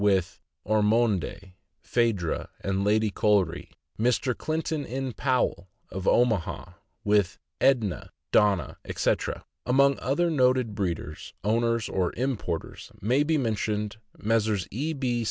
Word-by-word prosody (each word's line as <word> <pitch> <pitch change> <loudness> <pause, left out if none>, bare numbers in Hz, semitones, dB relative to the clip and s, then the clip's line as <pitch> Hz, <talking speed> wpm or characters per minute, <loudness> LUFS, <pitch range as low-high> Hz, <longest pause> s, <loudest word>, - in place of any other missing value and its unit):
with 95 -3 +2 0.3
Ormonde, 105 -3 +1 0.3
Phaedra, 110 -9 0
and 95 0 -1
Lady 105 +1 +2
Colrey; 105 -2 +1 0.3
Mr. 125 +2 +2
Clinton 155 -1 -2
N. 130 0 -4
Powell, 125 -8 0 0.2
Omaha, 100 +1 +1 0.3
with 100 -4 +2 0.2
Edne, 115 -9 +2 0.2
Donna, 100 -4 +3
etc. - - -1 0.2
Among 140 +2 +4
other 170 +6 +1
noted 130 -5 +2
breeders, 85 -6 -4
owners, 115 +1 +1
or 90 -2 0
importers, 115 -10 -3
may 125 +8 +2
be 155 +1 +2
mentioned 105 -4 -1 0.2
Messrs. 110 -3 +1
E. 145 +9 -2
B. 125 -4 -1
110 Hz, 110 wpm, -27 LUFS, 100-130 Hz, 0.3 s, Among